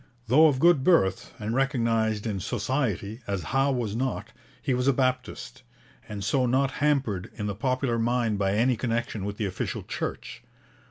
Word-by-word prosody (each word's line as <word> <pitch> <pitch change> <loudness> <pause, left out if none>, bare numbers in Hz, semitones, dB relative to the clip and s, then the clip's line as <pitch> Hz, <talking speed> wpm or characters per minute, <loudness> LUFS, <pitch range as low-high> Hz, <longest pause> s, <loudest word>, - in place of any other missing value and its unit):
Though 145 +8 +6
of 145 -4 +2
good 165 -2 +4
birth, 95 - +2
and 110 +1 -3
recognized 115 -5 +1
in 105 -4 -2
Society 115 0 -2
as 100 -3 -2
Howe 135 +1 +3
was 120 -5 -2
not, 130 +2 -2 0.3
he 135 - -1
was 125 +1 0
a 140 - +5
Baptist, 130 0 -2 0.5
and 100 -1 -5
so 125 +5 +1
not 135 +2 +2
hampered 135 -11 +1
in 105 - -4
the 100 - -2
popular 125 +2 -1
mind 115 -2 0
by 95 -1 +1
any 120 +4 +3
connection 115 -4 -2
with 100 0 -4
the 105 - -1
official 95 -1 -3
Church. - - -5
120 Hz, 170 wpm, -26 LUFS, 105-130 Hz, 0.5 s, Though